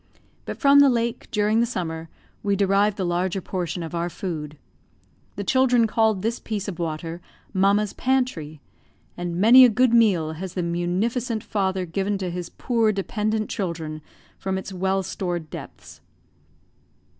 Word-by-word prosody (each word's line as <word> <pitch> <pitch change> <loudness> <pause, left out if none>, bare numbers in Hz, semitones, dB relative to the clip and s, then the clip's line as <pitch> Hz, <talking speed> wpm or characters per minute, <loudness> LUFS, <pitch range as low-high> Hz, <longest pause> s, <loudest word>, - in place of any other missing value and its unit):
But - - -5
from 280 0 +6
the 285 -1 +7
lake, 235 -1 -1
during 210 +1 +2
the 235 - +2
summer, 165 -7 -4 0.3
we 200 -1 +1
derived 200 +1 +2
the 190 - -1
larger 175 +2 0
portion 180 -2 -4
of 165 - -7
our 170 +1 -1
food. 155 -5 -5 0.8
The 200 - -4
children 250 0 +3
called 220 -3 +1
this 230 +2 -1
piece 210 -3 -4
of 180 -4 -5
water 165 +1 -4 0.3
"Mamma's 200 +1 +2
pantry"; 245 - -1 0.5
and 175 -1 -4
many 230 +8 +8
a 250 - +8
good 240 +2 +3
meal 195 -9 +4
has 175 +3 -7
the 180 - -1
munificent 205 +7 -1
Father 190 -2 -1
given 195 +4 -1
to 185 -2 -3
his 175 -1 -5
poor 230 -3 +1
dependent 215 +2 -1
children 160 -5 -4 0.4
from 190 0 -2
its 190 +1 -6
well 190 +1 0
stored 175 -3 -4
depths. - - -10
195 Hz, 155 wpm, -24 LUFS, 175-220 Hz, 0.8 s, many